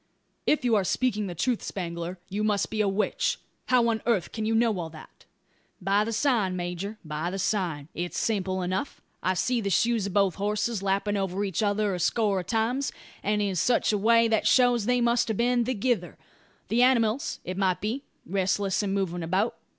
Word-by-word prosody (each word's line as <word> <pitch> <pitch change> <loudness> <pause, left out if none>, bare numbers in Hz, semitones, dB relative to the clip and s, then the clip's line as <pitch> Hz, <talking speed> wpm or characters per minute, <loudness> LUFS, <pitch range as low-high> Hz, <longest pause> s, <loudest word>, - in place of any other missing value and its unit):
"If 300 -4 +2
you 240 - +3
are 200 - +3
speaking 210 0 0
the 175 - -6
truth, 235 +8 0
Spangler, 170 -1 -5
you 205 +3 -2
must 210 -2 0
be 215 -1 0
a 210 - +2
witch. 195 +2 0 0.3
How 250 -2 +4
on 225 -2 0
earth 205 -8 +1
can 220 -1 -3
you 225 - +1
know 225 -4 +2
all 165 -2 -4
that?" 155 -1 -14 0.5
"By 200 +2 +2
the 230 - -3
sign, 225 -6 +1
major; 180 +4 -4
by 155 +2 -3
the 190 - -4
sign. 180 -7 -1
It's 175 +1 -4
simple 190 -4 -1
enough. 185 +9 -3 0.2
I 185 +1 +1
see 245 +5 +1
the 200 - -1
shoes 225 +1 +2
of 195 - -6
both 195 -3 +3
horses 210 +1 0
lapping 200 +1 0
over 195 0 -1
each 195 0 -1
other 205 -1 +1
a 180 - -3
score 200 +2 +1
of 180 - -7
times; 240 +5 0 0.3
and 210 +1 +1
in 195 -2 -1
such 235 +4 +2
a - - +2
way 230 +2 +5
that 220 -1 +1
shows 245 -4 +4
they 250 0 +2
must 235 0 +2
have 220 -3 -1
been 240 0 +2
thegither 245 0 -1 0.5
the 235 +2 +3
animals, 250 -1 +2
it 185 - -4
might 190 -2 +1
be, 225 +6 -2 0.2
restless 195 +1 0
and 200 -1 -1
movin' 175 -3 -1
about. 185 +7 0
205 Hz, 200 wpm, -27 LUFS, 185-230 Hz, 0.5 s, way